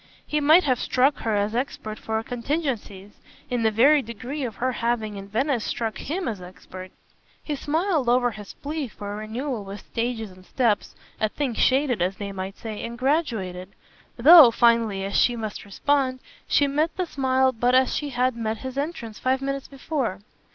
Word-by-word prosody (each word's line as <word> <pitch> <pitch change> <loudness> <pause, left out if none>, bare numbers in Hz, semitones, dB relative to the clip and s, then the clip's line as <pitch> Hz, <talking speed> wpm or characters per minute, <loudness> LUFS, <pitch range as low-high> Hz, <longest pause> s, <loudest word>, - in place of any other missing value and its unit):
He 300 - 0
might 310 +5 +6
have 255 -4 +1
struck 265 +3 +2
her 220 -2 -1
as 205 +1 0
expert 230 -3 -3
for 220 0 -2
contingencies 235 - -4 0.3
in 245 -1 0
the 220 - +3
very 275 +7 +5
degree 250 +5 -6
of 230 -5 -4
her 255 +1 -1
having 230 -3 -1
in 195 0 -8
Venice 240 +3 0
struck 225 -2 -3
HIM 340 +5 -3
as 210 -6 -4
expert. 185 +1 -10 0.5
He 300 - -3
smiled 310 -2 0
over 245 0 +3
his 210 -2 -10
plea 295 -1 -4
for 205 -2 -7
a - - -5
renewal 225 +2 -4
with 200 +1 -8
stages 230 -3 -3
and 185 0 -16
steps, 225 +1 0 0.2
a 215 - +1
thing 270 +1 -2
shaded, 255 -2 +2
as 185 +2 0
they 200 -1 -5
might 190 +1 -6
say, 220 -2 -6
and 235 0 -6
graduated; 225 - -1 0.4
though 300 +2 +10
finely 230 -4 +2
as 195 - -4
she 245 - +4
must 220 -3 -5
respond 260 +5 0 0.3
she 290 - +3
met 300 +4 0
the 365 - 0
smile 260 -3 +2
but 245 +1 +1
as 260 0 +4
she 295 - -2
had 255 -1 0
met 225 -1 -2
his 260 +2 -5
entrance 280 -8 -5
five 260 +1 +1
minutes 275 0 -3
before. 270 - -3
240 Hz, 185 wpm, -24 LUFS, 215-275 Hz, 0.5 s, though